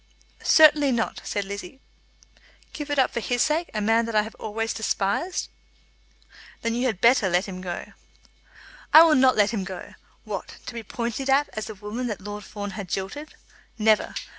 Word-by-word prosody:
"Certainly 295 Hz, -3 st, +6 dB
not," 230 Hz, -2 st, -2 dB
said 205 Hz, -1 st, -3 dB
Lizzie. 200 Hz, +5 st, -8 dB, 0.9 s
"Give 295 Hz, -1 st, -6 dB
it 290 Hz, -, -1 dB
up 265 Hz, -, +3 dB
for -, -, -1 dB
his 245 Hz, +1 st, 0 dB
sake, 315 Hz, +3 st, 0 dB
a 215 Hz, -, -3 dB
man 225 Hz, +2 st, +3 dB
that 230 Hz, -, -4 dB
I 210 Hz, -, +4 dB
have 220 Hz, -, -9 dB
always 225 Hz, +1 st, -3 dB
despised?" 220 Hz, -, -1 dB, 1.2 s
"Then 230 Hz, -, 0 dB
you 245 Hz, +2 st, 0 dB
had 215 Hz, -7 st, -2 dB
better 235 Hz, -5 st, +5 dB
let 180 Hz, +2 st, +1 dB
him 185 Hz, -2 st, -7 dB
go." 180 Hz, -1 st, -6 dB, 1.0 s
"I 320 Hz, -, +10 dB
will 325 Hz, -2 st, +5 dB
not 260 Hz, -2 st, +5 dB
let 210 Hz, 0 st, +3 dB
him 210 Hz, -5 st, -2 dB
go. 190 Hz, -2 st, -8 dB, 0.3 s
What, -, -, -6 dB
to -, -, -7 dB
be 235 Hz, -, -5 dB
pointed 235 Hz, +4 st, -4 dB
at 280 Hz, +2 st, +3 dB
as 215 Hz, -, -5 dB
the 220 Hz, -, -7 dB
woman 210 Hz, +5 st, -5 dB
that 210 Hz, -4 st, -4 dB
Lord 205 Hz, +1 st, -7 dB
Fawn 205 Hz, 0 st, -6 dB
had 195 Hz, -2 st, -7 dB
jilted? 195 Hz, +11 st, -5 dB, 0.4 s
Never! 215 Hz, -1 st, +2 dB
225 Hz, 185 wpm, -25 LUFS, 205-260 Hz, 1.2 s, I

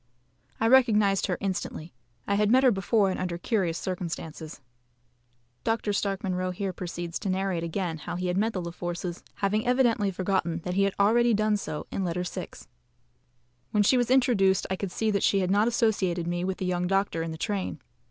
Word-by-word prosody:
I 225 Hz, -, +2 dB
recognised 215 Hz, -6 st, +4 dB
her 180 Hz, -, -1 dB
instantly. 185 Hz, -4 st, -4 dB, 0.3 s
I 200 Hz, -, 0 dB
had 205 Hz, +1 st, +2 dB
met 260 Hz, +3 st, +5 dB
her 255 Hz, -, +6 dB
before 195 Hz, 0 st, +2 dB
and -, -, -4 dB
under 180 Hz, -2 st, -2 dB
curious 180 Hz, -4 st, 0 dB
circumstances. 165 Hz, -3 st, -5 dB, 1.0 s
(Dr. 225 Hz, -2 st, 0 dB
Stark 195 Hz, -1 st, -1 dB
Munro 185 Hz, -1 st, -1 dB
here 185 Hz, +1 st, -3 dB
proceeds 175 Hz, -1 st, -5 dB
to 195 Hz, -, -3 dB
narrate 185 Hz, -2 st, -1 dB
again 170 Hz, -1 st, -3 dB
how -, -, -5 dB
he 180 Hz, +1 st, -3 dB
had 180 Hz, 0 st, 0 dB
met 220 Hz, +4 st, +1 dB
the 185 Hz, -, -2 dB
La 170 Hz, -, -5 dB
Forces, 175 Hz, 0 st, -5 dB
having 210 Hz, +2 st, 0 dB
evidently 240 Hz, -5 st, +3 dB
forgotten 185 Hz, -3 st, -1 dB
that 180 Hz, -, -3 dB
he 195 Hz, +1 st, +3 dB
had 200 Hz, -, -1 dB
already 230 Hz, +3 st, +4 dB
done 215 Hz, 0 st, +2 dB
so 155 Hz, -7 st, -4 dB
in 195 Hz, -, -2 dB
Letter 180 Hz, 0 st, -1 dB
VI.) 180 Hz, -, -5 dB, 1.2 s
When 210 Hz, -1 st, +2 dB
she 230 Hz, -, +4 dB
was 245 Hz, -1 st, +1 dB
introduced 230 Hz, -8 st, +3 dB
I -, -, +1 dB
could 190 Hz, -1 st, -4 dB
see 220 Hz, +3 st, 0 dB
that 200 Hz, -, 0 dB
she 195 Hz, -, +3 dB
had 185 Hz, 0 st, 0 dB
not 205 Hz, +3 st, +3 dB
associated 200 Hz, -7 st, +1 dB
me 175 Hz, +1 st, -2 dB
with 190 Hz, 0 st, -2 dB
the 190 Hz, -, -3 dB
young 180 Hz, 0 st, 0 dB
doctor 195 Hz, -3 st, 0 dB
in 165 Hz, -, -3 dB
the 160 Hz, -, -6 dB
train. 195 Hz, -3 st, -3 dB
195 Hz, 200 wpm, -27 LUFS, 180-210 Hz, 1.2 s, her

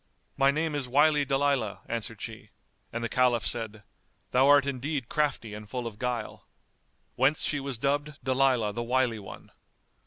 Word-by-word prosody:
"My 135 Hz, 0 st, +4 dB
name 155 Hz, +2 st, 0 dB
is 145 Hz, -3 st, -2 dB
Wily 145 Hz, +1 st, +4 dB
Dalilah," 135 Hz, -6 st, 0 dB
answered 115 Hz, -1 st, -4 dB
she, 110 Hz, -2 st, -7 dB, 0.4 s
and 115 Hz, 0 st, -4 dB
the -, -, 0 dB
Caliph 120 Hz, -2 st, +2 dB
said 110 Hz, -3 st, -2 dB, 0.5 s
"Thou 130 Hz, +2 st, +4 dB
art 145 Hz, -1 st, +6 dB
indeed 140 Hz, -1 st, -3 dB
crafty 145 Hz, -8 st, -1 dB
and 105 Hz, 0 st, -9 dB
full 125 Hz, -2 st, -4 dB
of 110 Hz, -2 st, -7 dB
guile." 125 Hz, -3 st, -4 dB, 0.7 s
Whence 135 Hz, +4 st, +2 dB
she 145 Hz, -, 0 dB
was 135 Hz, -3 st, -3 dB
dubbed 145 Hz, +4 st, 0 dB
Dalilah 130 Hz, -5 st, +2 dB
the 120 Hz, -, -3 dB
Wily 120 Hz, -1 st, +1 dB
One. 100 Hz, -, -11 dB
130 Hz, 160 wpm, -28 LUFS, 115-140 Hz, 0.7 s, art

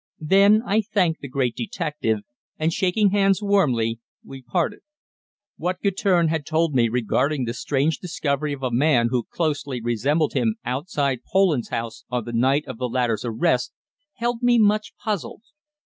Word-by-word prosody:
Then 200 Hz, +6 st, +5 dB
I 215 Hz, +1 st, +2 dB
thanked 190 Hz, -6 st, 0 dB
the 140 Hz, -, -6 dB
great 130 Hz, -3 st, -1 dB
detective, 120 Hz, -, -2 dB, 0.4 s
and, 160 Hz, +1 st, 0 dB
shaking 190 Hz, +3 st, +2 dB
hands 195 Hz, -1 st, +3 dB
warmly, 130 Hz, -, +1 dB, 0.3 s
we 135 Hz, -1 st, -10 dB
parted. 165 Hz, +7 st, -1 dB, 0.8 s
What 180 Hz, +2 st, -2 dB
Guertin 190 Hz, -3 st, +2 dB
had 160 Hz, -1 st, -1 dB
told 160 Hz, +1 st, 0 dB
me 120 Hz, -3 st, +3 dB
regarding 125 Hz, +4 st, 0 dB
the 115 Hz, -, -3 dB
strange 145 Hz, +4 st, 0 dB
discovery 150 Hz, -4 st, -2 dB
of 140 Hz, -1 st, -6 dB
a 130 Hz, -, -1 dB
man 125 Hz, -2 st, +3 dB
who 125 Hz, -3 st, -1 dB
closely 145 Hz, -5 st, -2 dB
resembled 135 Hz, +7 st, 0 dB
him 115 Hz, -5 st, +1 dB
outside 140 Hz, 0 st, -1 dB
Poland's 185 Hz, -10 st, +2 dB
house 115 Hz, -1 st, -4 dB
on 125 Hz, -3 st, -2 dB
the 120 Hz, -, -6 dB
night 135 Hz, +5 st, +2 dB
of -, -, -8 dB
the 125 Hz, -1 st, -2 dB
latter's 120 Hz, -2 st, 0 dB
arrest 120 Hz, +2 st, 0 dB, 0.4 s
held 240 Hz, 0 st, -2 dB
me 245 Hz, -1 st, +4 dB
much 215 Hz, -1 st, +2 dB
puzzled. 210 Hz, 0 st, -4 dB
145 Hz, 160 wpm, -23 LUFS, 125-185 Hz, 0.8 s, Then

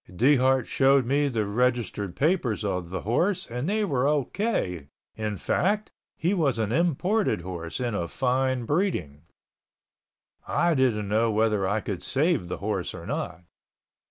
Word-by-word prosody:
Dehart 130 Hz, +5 st, +3 dB
showed 135 Hz, -1 st, +3 dB
me 140 Hz, +3 st, +2 dB
the 115 Hz, -6 st, -1 dB
registered 105 Hz, -3 st, -1 dB
papers 140 Hz, -, +1 dB
of 90 Hz, -4 st, -2 dB
the 95 Hz, +1 st, -4 dB
horse 175 Hz, -, +1 dB
and 125 Hz, +7 st, -3 dB
they 215 Hz, +1 st, +1 dB
were 135 Hz, -6 st, +1 dB
O.K., 145 Hz, -, -1 dB, 0.3 s
in 105 Hz, -2 st, -3 dB
fact, 210 Hz, -, 0 dB, 0.3 s
he 175 Hz, +5 st, +1 dB
was 150 Hz, -, +1 dB
an 110 Hz, -1 st, -1 dB
imported 175 Hz, -, +1 dB
horse 85 Hz, 0 st, -6 dB
and 120 Hz, -4 st, -1 dB
of 85 Hz, -4 st, -2 dB
fine 130 Hz, -1 st, 0 dB
breeding. 130 Hz, -, -1 dB, 1.3 s
I 170 Hz, +2 st, +2 dB
didn't 120 Hz, -7 st, +1 dB
know 110 Hz, +3 st, +2 dB
whether 105 Hz, -2 st, +1 dB
I 105 Hz, +3 st, 0 dB
could 100 Hz, -4 st, -4 dB
save 145 Hz, -, +1 dB
the 90 Hz, -, -4 dB
horse 100 Hz, -3 st, -3 dB
or 85 Hz, -2 st, -9 dB
not. 100 Hz, -, -4 dB
125 Hz, 150 wpm, -26 LUFS, 100-150 Hz, 1.3 s, Dehart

